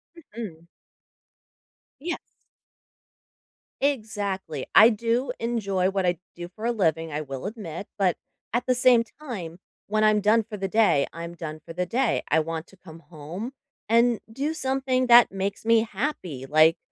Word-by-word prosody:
Mhm. 210 Hz, -, -9 dB, 1.3 s
Yes. 345 Hz, +3 st, -2 dB, 1.6 s
Exactly. 205 Hz, -, -2 dB
I 220 Hz, -, +10 dB
do 235 Hz, +3 st, 0 dB
enjoy 200 Hz, -6 st, 0 dB
what 195 Hz, -1 st, -1 dB
I 175 Hz, -2 st, +1 dB, 0.2 s
do 175 Hz, 0 st, -7 dB
for 220 Hz, -, -6 dB
a 240 Hz, -, +2 dB
living, 165 Hz, -7 st, 0 dB
I 150 Hz, -, -2 dB
will 135 Hz, +4 st, -6 dB
admit, 200 Hz, -5 st, -7 dB
but 185 Hz, -4 st, +2 dB, 0.4 s
at 240 Hz, -, 0 dB
the 255 Hz, -, +3 dB
same 245 Hz, -1 st, +5 dB, 0.2 s
time, 195 Hz, -, -6 dB, 0.3 s
when 215 Hz, +1 st, +1 dB
I'm 215 Hz, -1 st, +4 dB
done 215 Hz, +2 st, +4 dB
for 215 Hz, 0 st, -8 dB
the 195 Hz, -1 st, -3 dB
day, 205 Hz, -9 st, +3 dB
I'm 170 Hz, 0 st, -7 dB
done 155 Hz, -2 st, -7 dB
for 165 Hz, -, -8 dB
the 180 Hz, +1 st, -1 dB
day. 250 Hz, +6 st, +1 dB
I 160 Hz, -, +4 dB
want 160 Hz, +1 st, -3 dB
to 195 Hz, -, -19 dB
come 165 Hz, -3 st, -13 dB
home 170 Hz, -, -8 dB, 0.4 s
and 235 Hz, 0 st, +4 dB
do 280 Hz, +6 st, -2 dB
something 265 Hz, -3 st, 0 dB
that 240 Hz, -3 st, +8 dB
makes 195 Hz, +2 st, -3 dB
me 230 Hz, 0 st, +4 dB
happy, 190 Hz, -, -3 dB
like, 155 Hz, +3 st, +5 dB
205 Hz, 155 wpm, -25 LUFS, 165-235 Hz, 1.6 s, I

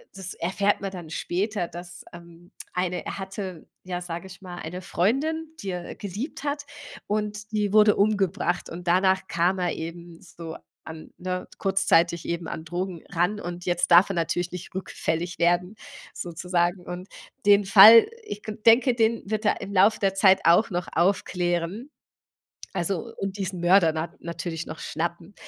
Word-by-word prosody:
das 190 Hz, -2 st, -7 dB
erfährt 200 Hz, +4 st, 0 dB
man 195 Hz, -, -3 dB
dann 175 Hz, -4 st, -8 dB
später, 190 Hz, +1 st, -2 dB
dass, 175 Hz, 0 st, -10 dB
ähm, 170 Hz, 0 st, -14 dB, 0.2 s
eine 180 Hz, -1 st, -2 dB
er -, -, -5 dB
hatte 190 Hz, -3 st, -6 dB, 0.2 s
ja, 180 Hz, -1 st, -4 dB
sage 175 Hz, +2 st, -6 dB
ich 190 Hz, -, -13 dB
mal, 180 Hz, -2 st, -8 dB
eine 180 Hz, +3 st, -6 dB
Freundin, 300 Hz, -, -1 dB
die 195 Hz, -2 st, -4 dB
er 175 Hz, -1 st, -6 dB
geliebt 210 Hz, -, -6 dB
hat 290 Hz, 0 st, -3 dB, 0.4 s
und 210 Hz, 0 st, -3 dB
die 210 Hz, -2 st, 0 dB
wurde 210 Hz, -1 st, +6 dB
umgebracht 200 Hz, -3 st, +1 dB
und 175 Hz, +1 st, -9 dB
danach 190 Hz, +1 st, +3 dB
kam 175 Hz, +3 st, +1 dB
er 175 Hz, -2 st, 0 dB
eben 170 Hz, +1 st, -8 dB
so 170 Hz, -3 st, -9 dB, 0.3 s
an, 160 Hz, 0 st, -10 dB
ne, 180 Hz, 0 st, -4 dB
kurzzeitig 175 Hz, -3 st, +2 dB
eben 170 Hz, -1 st, -3 dB
an 160 Hz, -, -6 dB
Drogen 175 Hz, 0 st, -4 dB
ran 180 Hz, +5 st, 0 dB
und 175 Hz, -1 st, -6 dB
jetzt 175 Hz, -1 st, 0 dB
darf 175 Hz, +4 st, +7 dB
er 195 Hz, -, -2 dB
natürlich 170 Hz, +1 st, -1 dB
nicht 180 Hz, 0 st, -8 dB
rückfällig 175 Hz, -2 st, -3 dB
werden 175 Hz, +3 st, +1 dB, 0.4 s
sozusagen. 175 Hz, +1 st, -1 dB
Und 180 Hz, +2 st, -7 dB, 0.4 s
den 205 Hz, -1 st, +5 dB
Fall, 220 Hz, -, +9 dB, 0.2 s
ich 210 Hz, -, -7 dB, 0.2 s
denke, 235 Hz, +2 st, +6 dB
den 230 Hz, 0 st, +1 dB
wird 215 Hz, 0 st, -2 dB
er -, -, +1 dB
im 200 Hz, +1 st, -6 dB
Lauf 200 Hz, +4 st, +4 dB
der 195 Hz, -1 st, +1 dB
Zeit 190 Hz, -1 st, +5 dB
auch 175 Hz, +6 st, +5 dB
noch 175 Hz, 0 st, -2 dB
aufklären. 175 Hz, -, 0 dB, 0.8 s
Also 175 Hz, 0 st, -2 dB
und 195 Hz, 0 st, -4 dB
diesen 190 Hz, -2 st, -4 dB
Mörder 175 Hz, -1 st, +5 dB
na 160 Hz, +1 st, -3 dB
natürlich 170 Hz, -1 st, -5 dB
noch 155 Hz, -, -8 dB
schnappen. 170 Hz, +3 st, -4 dB
180 Hz, 165 wpm, -25 LUFS, 175-200 Hz, 0.8 s, Fall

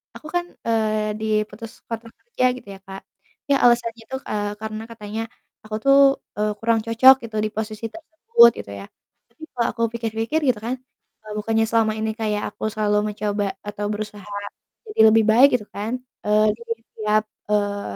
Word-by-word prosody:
aku 305 Hz, -, -10 dB
kan, 350 Hz, 0 st, +1 dB, 0.2 s
eee, 215 Hz, -1 st, +1 dB
diputus 215 Hz, +1 st, -2 dB, 0.2 s
kontrak 230 Hz, 0 st, -6 dB
kerja 240 Hz, +2 st, -1 dB
gitu 225 Hz, -, -14 dB
ya, 195 Hz, -, -14 dB
Kak. 195 Hz, 0 st, -8 dB, 0.5 s
Ya 275 Hz, -, +5 dB
alasannya 235 Hz, -1 st, +3 dB
itu, 265 Hz, -, -4 dB
eee, 205 Hz, -1 st, -2 dB
karena 220 Hz, 0 st, -5 dB
katanya 220 Hz, 0 st, -5 dB, 0.4 s
aku 215 Hz, -, -5 dB
tuh, 275 Hz, 0 st, +6 dB, 0.4 s
eee, 210 Hz, 0 st, +1 dB
kurang 230 Hz, 0 st, +2 dB
cocok 245 Hz, +4 st, +7 dB
gitu 225 Hz, -1 st, -9 dB
di 215 Hz, -, -1 dB
posisi 215 Hz, 0 st, -4 dB
tersebut 320 Hz, -, +4 dB
gitu -, -, -8 dB
ya. 100 Hz, -, -8 dB, 0.5 s
Tapi 315 Hz, -, -16 dB
kalau 235 Hz, -2 st, 0 dB
aku 230 Hz, -, -5 dB, 0.2 s
pikir-pikir 225 Hz, +6 st, -1 dB
gitu 240 Hz, -5 st, +2 dB
kan, 240 Hz, +3 st, -2 dB, 0.5 s
eee, 215 Hz, -1 st, -8 dB
bukannya 225 Hz, +1 st, +1 dB
selama 225 Hz, -1 st, +2 dB
ini 220 Hz, 0 st, -1 dB
kayak 210 Hz, -2 st, -1 dB
aku -, -, -11 dB
selalu 210 Hz, -1 st, +1 dB, 0.2 s
mencoba 205 Hz, 0 st, -1 dB, 0.2 s
atau 205 Hz, 0 st, -4 dB
berusaha 210 Hz, -1 st, -7 dB, 0.6 s
jadi -, -, +3 dB
lebih 225 Hz, 0 st, +5 dB
baik 250 Hz, +5 st, +8 dB
gitu 210 Hz, -, -11 dB
kan, 225 Hz, +5 st, -3 dB, 0.3 s
eee, 210 Hz, +1 st, +4 dB
di 235 Hz, -, -20 dB, 0.2 s
setiap, 215 Hz, -1 st, -1 dB, 0.3 s
eee, 205 Hz, -, -1 dB
220 Hz, 170 wpm, -22 LUFS, 210-230 Hz, 0.6 s, baik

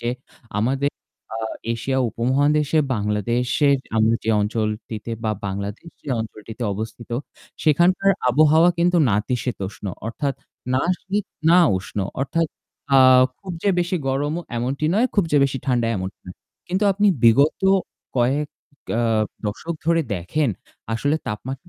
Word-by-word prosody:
যে 120 Hz, -, -2 dB, 0.5 s
আমাদের 135 Hz, +5 st, +1 dB, 0.4 s
আ -, -, -3 dB, 0.4 s
এশিয়া 130 Hz, +3 st, -1 dB
উপমহাদেশে, 145 Hz, +6 st, +1 dB, 0.2 s
বাংলাদেশে 115 Hz, +7 st, 0 dB, 0.3 s
আমরা 110 Hz, +1 st, +4 dB
যে -, -, -3 dB
অঞ্চলটিতে 110 Hz, +1 st, -3 dB
বা 110 Hz, -, +1 dB, 0.2 s
বাংলাদেশ 100 Hz, -, -5 dB
যে -, -, -22 dB
অঞ্চলটিতে 110 Hz, +2 st, -7 dB
অবস্থিত 110 Hz, +3 st, -7 dB, 0.5 s
সেখানকার 175 Hz, +6 st, +4 dB, 0.2 s
আবহাওয়া 155 Hz, +5 st, +5 dB
কিন্তু 175 Hz, +1 st, +3 dB
নাতিশীতোষ্ণ 105 Hz, -1 st, -2 dB, 0.2 s
অর্থাৎ 135 Hz, +4 st, -2 dB, 0.4 s
না 130 Hz, -, +2 dB, 0.2 s
শীত, 200 Hz, +1 st, -2 dB, 0.3 s
না 175 Hz, -, +7 dB, 0.2 s
উষ্ণ 95 Hz, +2 st, -6 dB, 0.2 s
অর্থাৎ, 165 Hz, +5 st, 0 dB, 0.5 s
আ -, -, +8 dB, 0.4 s
খুব 190 Hz, -2 st, -7 dB
যে -, -, +2 dB
বেশি 175 Hz, +1 st, 0 dB
গরমও 145 Hz, +5 st, -1 dB, 0.2 s
এমনটি 130 Hz, +5 st, -2 dB
নয়, 235 Hz, +4 st, +4 dB
খুব 200 Hz, -4 st, +3 dB
যে -, -, +5 dB
বেশি 135 Hz, -1 st, -1 dB
ঠান্ডা 120 Hz, -3 st, +2 dB
এমনটা 95 Hz, +1 st, -5 dB
নয়। 90 Hz, -, -9 dB, 0.3 s
কিন্তু 190 Hz, +4 st, 0 dB
আপনি 205 Hz, +2 st, +2 dB, 0.2 s
বিগত 140 Hz, +6 st, +5 dB, 0.6 s
কয়েক, 135 Hz, +5 st, +2 dB, 0.5 s
আ -, -, +2 dB, 0.4 s
দশক 110 Hz, +11 st, -3 dB
ধরে 165 Hz, 0 st, +3 dB
দেখেন 115 Hz, -, -1 dB, 0.5 s
আসলে 145 Hz, +7 st, +1 dB
তাপমাত্রা 130 Hz, -, -6 dB
130 Hz, 130 wpm, -22 LUFS, 110-155 Hz, 0.6 s, আ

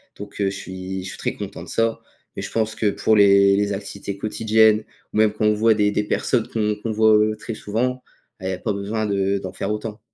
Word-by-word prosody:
Donc 100 Hz, 0 st, -10 dB
heu, 100 Hz, -, +2 dB
je 100 Hz, -, -6 dB
suis 95 Hz, 0 st, -6 dB
je 95 Hz, -, -6 dB
suis -, -, -8 dB
très -, -, -2 dB
content -, -, -7 dB
de -, -, -12 dB
ça. 115 Hz, 0 st, 0 dB, 0.4 s
Mais -, -, -3 dB
je -, -, -5 dB
pense 110 Hz, -1 st, -1 dB
que 105 Hz, -, +1 dB
pour 110 Hz, +2 st, +2 dB
les 100 Hz, -1 st, +6 dB
les 100 Hz, 0 st, 0 dB
activités 100 Hz, 0 st, -6 dB
quotidiennes, 110 Hz, +1 st, +3 dB, 0.3 s
ou -, -, -2 dB
même 110 Hz, -1 st, +4 dB
quand 110 Hz, -, -3 dB
on 105 Hz, -, +4 dB
voit 110 Hz, +1 st, +4 dB
des 105 Hz, -1 st, +2 dB
des 105 Hz, 0 st, -1 dB
personnes 115 Hz, +2 st, 0 dB
qu'on 105 Hz, -2 st, -1 dB
qu'on 115 Hz, -, -2 dB
voit, 110 Hz, 0 st, +4 dB
heu, 110 Hz, 0 st, +2 dB
très 110 Hz, +1 st, -6 dB
souvent, 125 Hz, +5 st, -2 dB, 0.4 s
beh, 95 Hz, -, -9 dB
il -, -, -1 dB
y -, -, -1 dB
a 90 Hz, -, -4 dB
pas 105 Hz, -, -2 dB
besoin 105 Hz, +2 st, -2 dB
de 100 Hz, -1 st, 0 dB
d'en 95 Hz, -1 st, -6 dB
faire -, -, -4 dB
autant. 105 Hz, +1 st, -4 dB
105 Hz, 255 wpm, -22 LUFS, 100-110 Hz, 0.4 s, les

